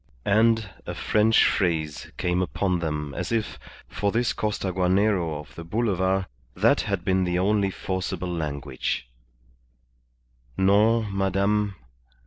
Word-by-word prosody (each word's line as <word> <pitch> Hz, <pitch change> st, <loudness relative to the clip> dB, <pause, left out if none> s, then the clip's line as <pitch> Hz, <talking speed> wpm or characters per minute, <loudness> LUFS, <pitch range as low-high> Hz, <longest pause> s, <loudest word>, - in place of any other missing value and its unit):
And 110 Hz, +1 st, +3 dB, 0.2 s
a -, -, -4 dB
French 110 Hz, +1 st, +3 dB
phrase 80 Hz, -6 st, -1 dB
came 90 Hz, 0 st, 0 dB
upon 90 Hz, 0 st, 0 dB
them 75 Hz, -3 st, -3 dB
as -, -, -4 dB
if, 115 Hz, -2 st, -2 dB, 0.3 s
for 100 Hz, -1 st, -1 dB
this 120 Hz, +2 st, +1 dB
Costaguanero 95 Hz, -4 st, 0 dB
of 75 Hz, -, -12 dB
the 85 Hz, -, -8 dB
Boulevard, 95 Hz, -1 st, 0 dB, 0.3 s
that -, -, +3 dB
had 100 Hz, -3 st, -3 dB
been 95 Hz, 0 st, +2 dB
the 90 Hz, -1 st, 0 dB
only 100 Hz, +1 st, +2 dB
forcible 90 Hz, -1 st, -3 dB
language 70 Hz, -6 st, -3 dB, 1.5 s
"_Non, 105 Hz, +4 st, +4 dB
Madame. 100 Hz, +1 st, +1 dB
95 Hz, 115 wpm, -25 LUFS, 90-105 Hz, 1.5 s, Non